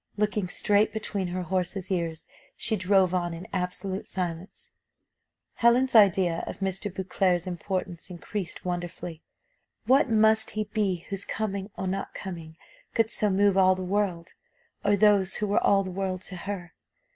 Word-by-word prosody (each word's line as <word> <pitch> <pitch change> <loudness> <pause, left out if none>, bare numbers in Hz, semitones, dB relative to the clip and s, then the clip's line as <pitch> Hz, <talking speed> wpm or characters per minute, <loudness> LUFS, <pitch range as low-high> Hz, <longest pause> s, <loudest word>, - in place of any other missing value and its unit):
Looking 210 -2 0
straight 205 +4 +2
between 205 -3 -2
her 180 +1 -3
horses' 185 +2 -2
ears, 165 -3 -2 0.3
she 220 - 0
drove 190 -1 +3
on 175 -2 -1
in 175 +4 -9
absolute 185 +1 -3
silence. 175 0 -5 0.9
Helen's 245 +2 +4
idea 190 -6 +5
of - - -5
Mr. 195 +1 -2
Beauclerc's 185 -1 0
importance 180 -1 -4
increased 180 +1 -5
wonderfully. 175 -2 -4 0.6
What 270 +1 +4
must 220 0 +4
he 215 - +2
be 195 -5 -1
whose 195 0 -2
coming 200 -2 -3
or - - -3
not 195 +1 -3
coming 165 -4 -7 0.4
could 225 0 +2
so 210 - +1
move 200 0 +3
all 185 -1 +5
the 185 - -5
world, 185 -3 -1 0.5
or 205 0 +4
those 200 -2 +4
who 210 - -1
were 205 0 +1
all 195 -1 +4
the 185 - -5
world 185 -1 -3
to 190 - -6
her? 180 -1 -6
190 Hz, 155 wpm, -27 LUFS, 180-205 Hz, 0.9 s, idea